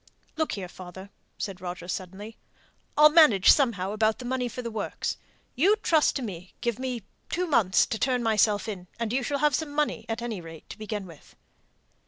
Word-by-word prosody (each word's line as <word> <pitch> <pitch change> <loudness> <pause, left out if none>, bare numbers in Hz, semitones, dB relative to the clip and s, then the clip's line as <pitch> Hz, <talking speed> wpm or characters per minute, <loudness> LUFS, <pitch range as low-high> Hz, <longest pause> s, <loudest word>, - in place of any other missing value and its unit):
"Look 315 -1 -1
here, 190 -3 -4
father!" 190 +2 -11 0.3
said 190 -3 -5
Roger, 175 -1 -6
suddenly, 190 +4 -6 0.6
"I'll 300 0 +8
manage 300 - +7
somehow 210 -9 +2
about 215 +1 +1
the 250 - -8
money 250 0 -1
for 250 - -6
the 235 - -4
works. 215 -2 -3 0.4
You 365 +11 +4
trust 325 -8 +2
to 270 - -2
me; 185 -4 -7
give 235 -1 -2
me 250 -4 -3 0.3
two 360 +1 0
months 215 - +3
to 220 - -4
turn 250 -2 +1
myself 215 -1 +2
in, 185 -4 -6
and 230 -1 -2
you 265 - +1
shall 280 +3 -1
have 295 0 +2
some 315 +2 -1
money, 295 +1 -1
at 225 +1 -3
any 225 -6 -4
rate, 165 -1 -11
to - - -8
begin 210 -2 -4
with." 165 -5 -15
225 Hz, 195 wpm, -27 LUFS, 190-265 Hz, 0.6 s, I'll